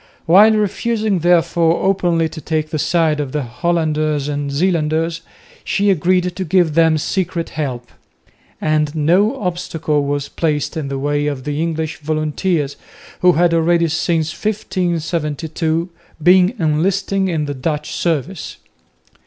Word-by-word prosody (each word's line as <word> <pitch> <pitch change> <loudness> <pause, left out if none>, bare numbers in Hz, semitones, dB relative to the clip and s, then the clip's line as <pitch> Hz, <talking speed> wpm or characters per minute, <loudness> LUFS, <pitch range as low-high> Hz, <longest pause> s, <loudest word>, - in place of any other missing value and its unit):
While 205 +6 +6
refusing 215 -1 0
therefore 170 -1 +2
openly 175 -4 +2
to 155 - -9
take 155 +1 -2
the 155 - -2
side 155 0 +1
of 140 -3 -4
the 150 -2 -1
Hollanders 155 +1 -1
and 145 -1 -3
Zeelanders, 165 0 0 0.4
she 200 0 +1
agreed 180 0 +1
to 190 - -3
give 175 -2 +2
them 160 0 +4
secret 175 +1 -2
help; 125 -5 -4 0.7
and 155 -1 0
no 185 - +2
obstacle 165 -5 -1
was 140 0 -2
placed 150 -3 -2
in 155 -3 -3
the 135 0 -3
way 145 +1 -1
of 140 -3 -3
the 150 +2 -2
English 160 -1 -2
volunteers, 155 0 -1 0.4
who 180 0 +5
had 170 +1 +3
already 170 0 +2
since 160 0 0
1572 165 -4 -2 0.3
been 185 +5 +5
enlisting 190 +4 0
in 160 -4 -1
the 145 - -3
Dutch 150 +2 -3
service. 165 +1 -2
160 Hz, 135 wpm, -18 LUFS, 150-180 Hz, 0.7 s, While